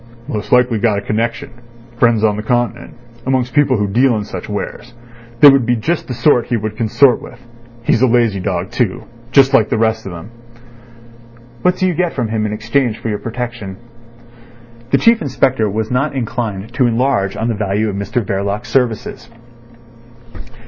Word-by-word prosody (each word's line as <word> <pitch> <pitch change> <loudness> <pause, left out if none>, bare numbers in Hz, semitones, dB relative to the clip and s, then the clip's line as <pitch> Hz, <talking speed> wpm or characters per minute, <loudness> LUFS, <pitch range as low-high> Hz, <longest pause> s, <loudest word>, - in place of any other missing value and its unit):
"Most 105 -8 -5
likely 125 -3 +3
got 110 -2 +1
a - - -2
connection—friends 115 +1 -2
on 105 -2 +3
the 105 - -4
Continent—amongst 120 +1 -3
people 140 -4 +3
who 105 - 0
deal 120 +4 +2
in 105 - -3
such 95 -1 -8
wares. 115 +3 -6 0.5
They 145 - +11
would 135 -2 +3
be 120 +1 +1
just 155 +9 -2
the 125 - -4
sort 120 0 +2
he 120 - 0
would 110 0 -4
consort 120 +4 +3
with. - - -12 0.4
He's 115 - +2
a 130 - +5
lazy 115 -4 +2
dog, 90 +1 -3
too—like 120 +2 +1
the - - 0
rest 110 -1 0
of - - -6
them." 85 +6 -9 1.3
"What 180 0 +2
do 185 - -1
you 185 - +1
get 175 0 -1
from 120 -4 -2
him 110 -1 -1
in - - -4
exchange 110 +2 0
for 115 - -5
your 105 - -2
protection?" 115 -5 -6 1.1
The 140 - +3
Chief 230 +5 +3
Inspector 130 -5 +1
was 110 +3 -3
not 140 +3 0
inclined 115 -3 -4
to 125 -1 +2
enlarge 115 -5 0
on 115 - -1
the 120 - 0
value 105 0 -1
of 100 - -3
Mr 100 +4 -2
Verloc's 100 +5 -3
services. 115 -1 -1
115 Hz, 170 wpm, -16 LUFS, 105-125 Hz, 1.3 s, They